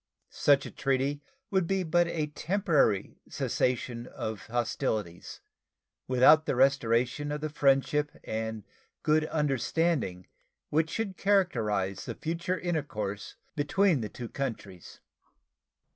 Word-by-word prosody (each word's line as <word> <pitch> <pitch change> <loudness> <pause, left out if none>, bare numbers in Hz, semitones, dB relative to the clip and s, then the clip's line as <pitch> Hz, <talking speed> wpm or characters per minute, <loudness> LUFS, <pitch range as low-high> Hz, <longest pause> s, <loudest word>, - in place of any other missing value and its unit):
Such 140 -1 +3
a - - -7
treaty 135 +1 0 0.3
would 190 -3 +2
be 195 0 +1
but 175 +1 +2
a 160 -3 -1
temporary 150 - +1
cessation 120 -1 -1
of 110 -2 -6
hostilities, 110 -6 -2 0.7
without 150 +5 +6
the - - +1
restoration 130 +1 +2
of 150 0 -3
the 155 -1 -3
friendship 145 +1 +2
and 110 -1 -4 0.4
good 155 0 +3
understanding 145 - 0 0.5
which 160 +2 +2
should 200 -3 -3
characterize 110 - +1
the - - -5
future 170 +3 -2
intercourse 140 - -3 0.2
between 160 +1 +2
the 105 - -4
two 120 - -7
countries. 110 -9 -6
140 Hz, 115 wpm, -29 LUFS, 115-160 Hz, 0.7 s, without